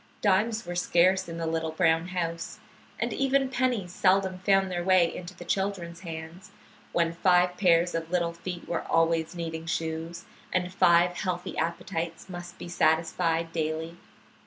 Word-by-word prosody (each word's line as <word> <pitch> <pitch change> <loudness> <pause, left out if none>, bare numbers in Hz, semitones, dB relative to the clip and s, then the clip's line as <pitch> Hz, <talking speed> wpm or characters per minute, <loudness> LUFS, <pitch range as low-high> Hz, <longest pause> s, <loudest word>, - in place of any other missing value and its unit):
Dimes 215 +2 +2
were 175 - -4
scarce 180 +1 +2
in 165 - -6
the 165 - -3
little 160 0 -1
brown 165 0 +2
house, 170 -2 -3 0.4
and - - -1
even 270 0 +2
pennies 245 -8 0
seldom 185 0 +2
found 195 0 +2
their 175 -1 -2
way 185 -2 +4
into 180 +1 -8
the - - -9
children's 190 -4 -2
hands 165 +1 -8 0.4
when 170 -1 +1
five 180 +1 +3
pairs 175 -2 +3
of 165 0 -3
little 170 -1 0
feet 175 +1 -7
were - - -1
always 165 0 +2
needing 165 -1 -5
shoes, 165 +1 -3 0.3
and 180 0 -1
five 175 -1 +4
healthy 180 -3 -3
appetites 165 0 -3
must 175 -1 -8
be - - -8
satisfied 165 0 +1
daily. 160 +1 -2
175 Hz, 155 wpm, -28 LUFS, 165-185 Hz, 0.4 s, way